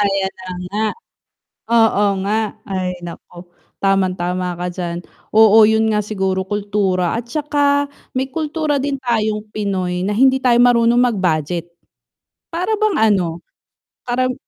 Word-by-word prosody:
Ayan 195 -1 0
na 185 - -9 0.2
nga. 210 +2 -1 0.9
Oo 225 -3 +4 0.2
nga. 215 +2 +1 0.3
Ay 185 -2 -2
naku, 175 +1 -11 0.3
tamang 195 -1 +2
tama 180 +1 -2
ka 180 0 -3
diyan. 175 -1 -4 0.3
Oo, 220 0 +7
'yun 220 +1 +3
nga 210 - +2
siguro 190 -2 -1
kultura 200 -2 -1
at 235 +1 -5
saka 285 -1 +1 0.3
may 260 +1 0
kultura 305 +1 -2
din 275 0 -2
tayong 215 -4 -1
Pinoy 185 -3 -2
na 205 - -1
hindi 260 +5 +4
tayo 245 -2 +3
marunong 240 -1 +4
mag-budget. 175 -7 0 0.8
Para 360 +6 -1
bang 430 -4 +1 0.2
ano, 170 -4 -1 0.7
karam 255 +1 0
210 Hz, 135 wpm, -18 LUFS, 185-245 Hz, 0.9 s, Oo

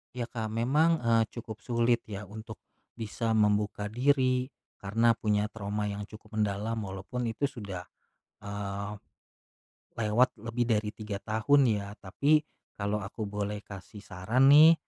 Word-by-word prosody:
Ya, 120 -1 -2
Kak, 110 -2 -4
memang, 145 +9 +3
eee, 115 -1 +5
cukup 110 -2 -8
sulit 120 -1 +2
ya 100 0 -5
untuk, 110 +2 -9 0.4
bisa 115 +1 -2
membuka 105 -1 +2
diri 130 +2 +2 0.2
karena 115 +4 +2
punya 105 -1 +1
trauma 105 -1 -3
yang 100 0 -4
cukup 110 +1 -12
mendalam 105 +1 0
walaupun 100 +6 -5
itu 140 +5 0
sudah, 100 -8 -7 0.5
eee, 100 0 -4 1.1
lewat 110 +4 +3
lebih 115 +2 -1
dari 110 -2 +1
3 105 -2 -5
tahun 125 +6 +3
ya. 100 -2 0
Tapi 145 +11 +3 0.4
kalau 100 +1 0
aku 105 +2 -5
boleh 105 0 -3
kasih 100 +1 -10
saran 110 +8 +2
nih, 155 +3 +9
110 Hz, 135 wpm, -30 LUFS, 105-120 Hz, 1.1 s, nih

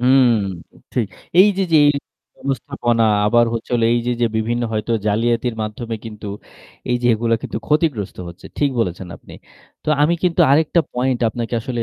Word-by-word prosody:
হুম। 130 +1 +5 0.7
ঠিক 120 -4 0 0.3
এইযে, 195 0 +4
যে 155 - +7 0.6
ব্যবস্থাপনা 120 -3 -1 0.2
আবার 120 +2 +4
হচ্ছে 115 - -5
হল 120 - +1
এইযে, 120 +1 0
যে - - +5
বিভিন্ন 120 +2 -1
হয়তো 110 +1 -1
জালিয়াতির 115 +3 +1
মাধ্যমে 110 +2 -5
কিন্তু 105 -2 -8 0.6
এইযে 120 0 0
এগুলো 115 +1 +1
কিন্তু - - -4
ক্ষতিগ্রস্ত 150 - 0
হচ্ছে। 85 - -12
ঠিক 145 -1 +2
বলেছেন, 90 -3 -3
আপনি। - - -14 0.5
তো - - -5
আমি 160 +3 +3
কিন্তু 180 -1 +1
আরেকটা 155 +4 +4
পয়েন্ট 125 0 0
আপনাকে 120 +2 -4
আসলে 120 0 -3
120 Hz, 150 wpm, -19 LUFS, 115-135 Hz, 0.7 s, যে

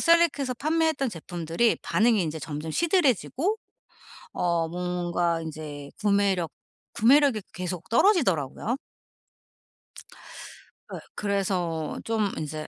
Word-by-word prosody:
셀렉해서 330 -6 +3
판매했던 310 0 +1
제품들이 170 +5 0
반응이 220 -2 +3
인제 160 -1 -3
점점 150 +1 -5
시들해지고 340 - +1 0.8
어 170 -2 +1
뭔가 175 -1 -1
인제 150 -3 -7
구매력, 200 -5 +2 0.4
구매력이 260 -2 +4
계속 180 0 -5
떨어지더라고요. 230 - +2 2.2
예. - - -5 0.2
그래서 185 -6 -1
좀 220 -3 0
이제 155 0 -5
190 Hz, 245 characters per minute, -26 LUFS, 165-255 Hz, 2.2 s, 구매력이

